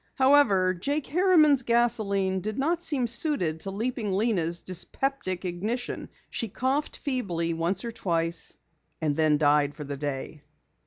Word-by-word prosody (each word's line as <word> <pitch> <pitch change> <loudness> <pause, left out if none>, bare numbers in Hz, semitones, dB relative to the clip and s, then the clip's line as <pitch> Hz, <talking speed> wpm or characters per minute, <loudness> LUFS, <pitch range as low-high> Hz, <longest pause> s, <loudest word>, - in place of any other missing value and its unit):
However, 260 -10 +4
Jake 280 - -2
Harriman's 310 -5 +4
gasoline 215 -6 +1
did 215 +3 -4
not 330 +5 0
seem 285 -7 0
suited 235 - +2
to 195 - -5
Leaping 215 0 -2
Lena's 185 -5 0
dyspeptic 185 +1 -2
ignition. 210 +8 -3 0.2
She 230 - -2
coughed 265 +8 -2
feebly 180 - -2
once 170 +6 -1
or 235 - -3
twice 165 -5 -2 0.4
and 150 -3 0
then 155 -1 +3
died 145 -1 +2
for 150 - -7
the 140 0 -6
day. 145 +1 -5
195 Hz, 140 wpm, -27 LUFS, 165-260 Hz, 0.4 s, However